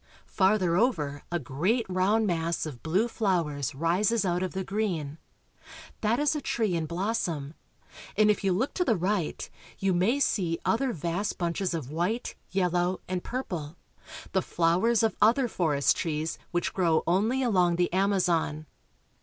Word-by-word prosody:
Farther 190 -3 +2
over 150 - 0
a 175 - +1
great 175 - 0
round 190 +4 +2
mass 170 -3 -1
of 140 -6 -7
blue 185 +8 +1
flowers 170 - -1
rises 190 +8 +1
out 175 0 0
of 185 - -2
the 190 0 -2
green. 175 -8 -2 0.8
That 220 +2 +2
is 295 +1 +2
a 300 - -2
tree 220 -7 0
in 165 -2 -1
blossom, 170 -5 -2 0.6
and 210 0 +5
if 210 - -2
you 195 - +2
look 215 +10 0
to 360 - +1
the 235 -10 +2
right 185 -2 -1 0.3
you 195 -1 +1
may 200 +10 +2
see 175 -11 +1
other 255 +3 +1
vast 175 +3 -2
bunches 175 +1 -1
of 145 -4 -5
white, 180 +9 -1 0.2
yellow, 180 -1 0
and 180 -1 -3
purple, 175 - -4 0.6
the 190 - +2
flowers 180 +9 +2
of 225 - +1
other 240 +4 +4
forest 155 -10 +1
trees 160 -1 -2
which 175 -1 -1
grow 170 -4 +2
only 215 +10 +1
along 180 -7 +3
the 175 0 0
Amazon. 180 -6 +1
185 Hz, 155 wpm, -28 LUFS, 165-215 Hz, 0.8 s, and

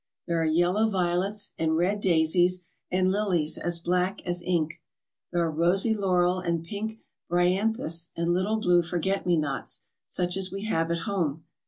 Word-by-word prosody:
There 170 -1 0
are - - +1
yellow 175 +7 +2
violets 190 +2 -1
and 160 0 +1
red 190 +5 +1
daisies 180 0 +3 0.2
and 185 0 +1
lilies 185 -6 +2
as 175 -1 0
black 180 +3 0
as 175 0 -2
ink. 170 -3 -1 0.5
There 175 -1 +1
are 160 - -1
rosy 175 +7 +3
laurel 185 -3 +1
and 170 -2 -2
pink 215 +5 -5 0.3
bryanthus 175 -1 0
and 170 +1 +1
little 195 +5 0
blue 180 -4 +3
forget 180 +3 -2
me 175 -1 +3
nots 145 -3 -3 0.2
such 180 +1 -1
as 190 -1 +1
we 195 +1 -5
have 165 -6 0
at 170 0 -1
home. 165 -7 -2
180 Hz, 165 wpm, -26 LUFS, 170-195 Hz, 0.5 s, daisies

